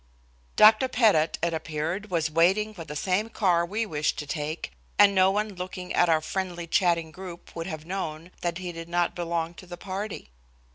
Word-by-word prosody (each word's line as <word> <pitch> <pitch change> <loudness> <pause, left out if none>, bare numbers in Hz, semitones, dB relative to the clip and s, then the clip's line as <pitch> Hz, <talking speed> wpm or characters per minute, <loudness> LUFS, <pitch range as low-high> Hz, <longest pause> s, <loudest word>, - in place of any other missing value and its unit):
Dr. 215 +4 +7
Pettit, 210 -11 +3
it 170 -1 +1
appeared, 160 +6 -3
was 165 -3 0
waiting 190 +7 +3
for 175 -5 -8
the 150 -1 -8
same 190 +7 0
car 180 -7 +2
we 210 +6 -2
wished 150 -7 -1
to 150 - -4
take, 150 +2 -4 0.3
and 205 -1 +7
no 190 0 +5
one 210 +1 -1
looking 180 0 -6
at 175 - +3
our 160 -1 +4
friendly 175 0 -3
chatting 170 -2 +1
group 175 0 -10
would 165 +1 -4
have 155 -3 -6
known 170 -2 -5
that 175 -1 -1
he 180 -1 -5
did 165 0 -8
not 175 0 +1
belong 170 -1 -2
to 185 - -13
the 175 0 -8
party. 195 - -6
175 Hz, 190 wpm, -27 LUFS, 165-195 Hz, 0.3 s, Dr